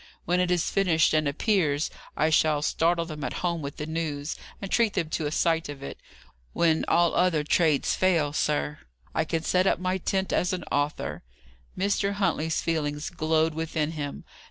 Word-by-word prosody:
When 180 +2 +1
it 180 -1 +1
is 180 -2 +1
finished 170 -6 +3
and 155 -1 +2
appears, 155 -2 +1 0.3
I 155 +1 +2
shall 155 -1 +3
startle 170 +3 +1
them 155 -3 -7
at - - -3
home 170 -2 0
with 140 -1 -6
the 150 - -4
news, 155 -2 -3 0.2
and 195 - -6
treat 230 -3 +3
them 160 -1 -1
to 155 -2 -1
a - - -3
sight 165 0 +1
of 140 -1 -8
it. - - -7 0.5
When 165 -2 +2
all 170 0 +3
other 175 -4 +2
trades 155 -1 +2
fail, 165 -6 +2
sir, 150 0 -1 0.3
I 160 - +1
can 160 0 -2
set 185 +2 +2
up - - +3
my 185 +1 -1
tent 190 +1 -1
as 180 - +1
an 180 -2 -3
author." 145 +1 -1 0.6
Mr. 200 +1 +1
Huntley's 160 -5 0
feelings 150 -2 -2
glowed 160 -2 +1
within 160 -1 -2
him. 145 -3 -5
160 Hz, 180 wpm, -27 LUFS, 150-180 Hz, 0.6 s, finished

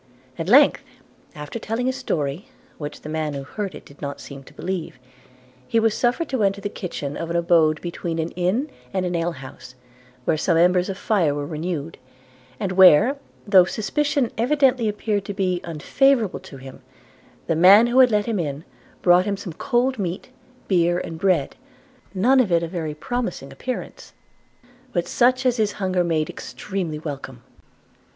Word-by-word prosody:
At 165 +2 -3
length, 280 +6 +6 0.5
after 150 +9 -6
telling 225 +3 -3
his 260 0 0
story, 155 - -3 0.3
which 145 -1 -7
the - - -9
man 155 -1 -2
who 140 - -5
heard 195 +7 -5
it - - -11
did 140 - -17
not 140 -1 -5
seem 135 -1 -10
to - - -16
believe, 180 -7 -4 0.7
he 230 - +2
was 225 -1 +2
suffered 250 +7 0
to 260 -4 -1
enter 200 0 +1
the 205 - -4
kitchen 145 -8 -5
of 165 - -5
an 170 - -2
abode 165 -2 +3
between 170 -1 -4
an 160 +1 -2
inn 200 - -1 0.2
and 185 -1 0
an 180 - -2
alehouse; 140 -6 -5 0.5
where 155 - +2
some 165 0 +2
embers 180 +2 +3
of 190 - -4
fire 180 -11 +1
were 145 -1 -3
renewed, 160 0 -4 0.6
and 195 -3 -2
where, 185 - +6 0.3
though 195 -3 +7
suspicion 280 +5 -1
evidently 255 -2 +2
appeared 210 -1 -2
to 200 - -5
be 185 -3 0
unfavourable 215 - +1
to 135 - -12
him, 130 0 -12 0.6
the 165 - 0
man 190 +7 +7
who 240 +2 +2
had 255 -1 +7
let 210 -2 +1
him 225 -4 -1
in 145 -2 -3 0.4
brought 180 +1 +5
him 200 -1 -1
some 185 -4 -7
cold 250 - 0
meat, 185 +4 -4 0.4
beer 175 -2 +2
and 165 -2 -5
bread, 180 -6 +1 0.6
none 250 +8 +4
of 225 -8 +2
it 170 0 +3
of 165 - -5
a - - -9
very 155 -3 -3
promising 180 - -4
appearance, 255 -1 -6 0.8
but - - -1
such 255 +1 +2
as 250 -1 +2
his 215 -2 +1
hunger 185 -2 0
made 160 -3 0
extremely 180 -5 -5
welcome. 135 -5 -7
180 Hz, 175 wpm, -22 LUFS, 160-225 Hz, 0.8 s, though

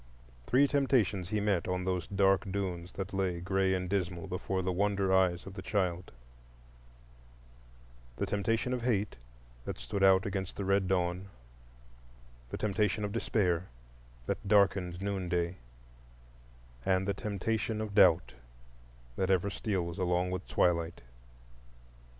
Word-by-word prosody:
Three 140 +3 +5
temptations 120 -10 +1
he 105 - 0
met 100 -4 0
on 90 0 -1
those 90 -2 -1
dark 95 0 +2
dunes 90 -3 -3
that 95 +1 -5
lay 95 -3 0
gray 95 +1 +1
and 90 0 -2
dismal 90 -3 -2
before 95 +1 -2
the 95 - 0
wonder 100 0 +1
eyes 90 -2 +2
of 95 - -8
the 95 - -7
child: 90 -3 -1 2.0
the - - -1
temptation 115 +4 0
of 125 - -2
Hate, 110 -4 0 0.5
that - - -5
stood 65 +12 -4
out 95 0 +6
against 95 -1 -3
the 100 - -4
red 100 0 +2
dawn; 90 0 0 1.2
the - - -4
temptation 105 0 0
of 100 - -4
Despair, 95 -6 0 0.6
that - - -3
darkened 95 -3 +2
noonday; 90 -3 -1 1.3
and 95 +3 +1
the 100 - +1
temptation 110 +2 -2
of 110 -2 -4
Doubt, 85 - +5 0.8
that 95 - 0
ever 95 +1 +2
steals 95 -5 -2
along 90 0 +1
with 90 0 -4
twilight. 85 -1 +1
95 Hz, 130 wpm, -31 LUFS, 90-100 Hz, 2.0 s, out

